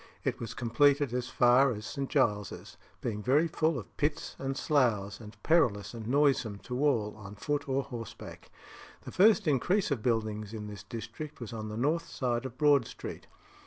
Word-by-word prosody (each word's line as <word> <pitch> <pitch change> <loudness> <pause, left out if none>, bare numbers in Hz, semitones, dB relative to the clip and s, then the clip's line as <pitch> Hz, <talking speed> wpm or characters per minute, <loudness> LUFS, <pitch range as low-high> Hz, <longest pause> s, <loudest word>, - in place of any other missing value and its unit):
it - - -1
was 115 - -6
completed 140 +3 +3
as 125 0 -2
far 125 +2 +5
as 105 0 -7
St. 135 +4 -4
Giles's, 105 - 0 0.3
being 105 -3 -3
very 145 +9 +3
full 160 -2 0
of 115 - -9
pits 150 0 -2
and 135 0 -3
sloughs, 110 -9 +1
and 110 -1 -11
perilous 110 - +2
and 115 -2 -7
noisome 135 -6 +2
to 125 +3 -3
all 110 -8 +1
on 105 -1 -10
foot 145 +5 -2
or 135 +1 +1
horseback. 115 -4 -9 0.5
The - - -8
first 210 0 +5
increase 175 +7 +2
of 130 -6 0
buildings 110 -2 -1
in 105 -1 -5
this 105 -2 -8
district 115 +8 -7
was 120 -2 -7
on 110 -1 -5
the 105 - -5
north 155 +7 0
side 120 -1 -1
of 130 0 -13
Broad 145 -4 +4
Street. - - -8
125 Hz, 180 wpm, -30 LUFS, 110-145 Hz, 0.5 s, far